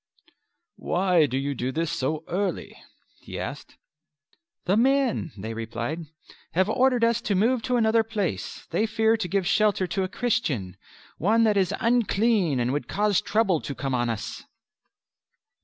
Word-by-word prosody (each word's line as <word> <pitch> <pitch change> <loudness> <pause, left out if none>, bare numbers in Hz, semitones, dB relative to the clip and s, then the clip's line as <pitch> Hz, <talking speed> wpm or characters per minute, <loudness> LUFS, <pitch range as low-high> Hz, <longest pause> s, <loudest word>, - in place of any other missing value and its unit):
"Why 180 -4 +2
do 130 - -2
you 140 +1 -1
do 130 0 -3
this 165 +2 -1
so 155 +4 -2
early?" 185 0 -2 0.4
he - - -8
asked. - - -7 0.9
"The 185 - +2
men," 260 - +2
they 110 +3 -5
replied, 120 +8 -4 0.5
"have 185 +3 +2
ordered 250 0 +2
us 230 0 +2
to 205 - -1
move 230 +6 +2
to 250 +2 -1
another 225 -1 +3
place; 210 -5 -4
they 220 - +1
fear 220 0 +2
to 210 -5 -3
give 195 +1 0
shelter 195 +1 +2
to 180 +2 -2
a 185 - 0
Christian 150 - -1 0.4
one 220 +7 +3
that 215 -2 +3
is 190 -2 +2
unclean 220 - +2
and 120 +2 0
would 145 - -2
cause 205 -1 +1
trouble 195 -7 +1
to 140 - -6
come 135 -1 -3
on 120 -1 0
us." 115 -2 -5
195 Hz, 155 wpm, -25 LUFS, 150-225 Hz, 0.9 s, another